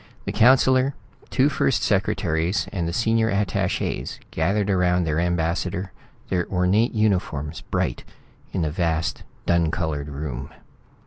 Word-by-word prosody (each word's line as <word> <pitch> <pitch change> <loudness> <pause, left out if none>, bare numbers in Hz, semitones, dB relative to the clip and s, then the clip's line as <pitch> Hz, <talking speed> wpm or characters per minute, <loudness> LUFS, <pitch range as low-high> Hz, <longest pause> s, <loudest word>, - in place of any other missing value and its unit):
The - - -2
councillor, 130 +3 +4 0.3
two - - +3
first - - +1
secretaries 85 +3 0
and 85 -4 -1
the - - -1
senior 115 +3 +2
attaches 100 -2 -1
gathered 100 +6 +1
around 90 -2 +2
the 80 -2 -1
ambassador, 85 +2 -1 0.4
their 90 -2 0
ornate 95 +6 +2
uniforms 90 -9 0
bright - - -2 0.5
in 90 - -1
the 75 - -1
vast 80 -1 -1 0.2
dun 85 -2 +3
colored 75 -3 -2
room. 70 -3 -5
90 Hz, 125 wpm, -23 LUFS, 80-100 Hz, 0.5 s, councillor